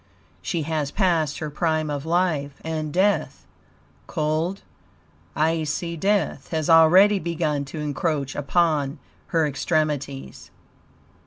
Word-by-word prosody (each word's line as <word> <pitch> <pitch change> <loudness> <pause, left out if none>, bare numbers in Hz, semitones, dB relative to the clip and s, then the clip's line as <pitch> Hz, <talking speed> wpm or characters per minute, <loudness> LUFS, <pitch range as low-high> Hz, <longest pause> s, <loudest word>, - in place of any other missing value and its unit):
She 160 - -2
has 155 -2 -2
passed 165 -6 +1
her 155 -1 -5
prime 155 -1 0
of 145 +1 -4
life, 160 -5 0
and 155 -2 -3
death 195 +5 0 0.6
cold, 155 +5 -1 0.7
icy 160 +1 0
death 200 +4 0
has 160 -1 0
already 185 +6 +6
begun 160 -4 -1
to 140 - -9
encroach 150 -1 -2
upon 150 -1 +1 0.3
her 165 -4 +1
extremities. 145 - -2
155 Hz, 105 wpm, -23 LUFS, 145-170 Hz, 0.7 s, already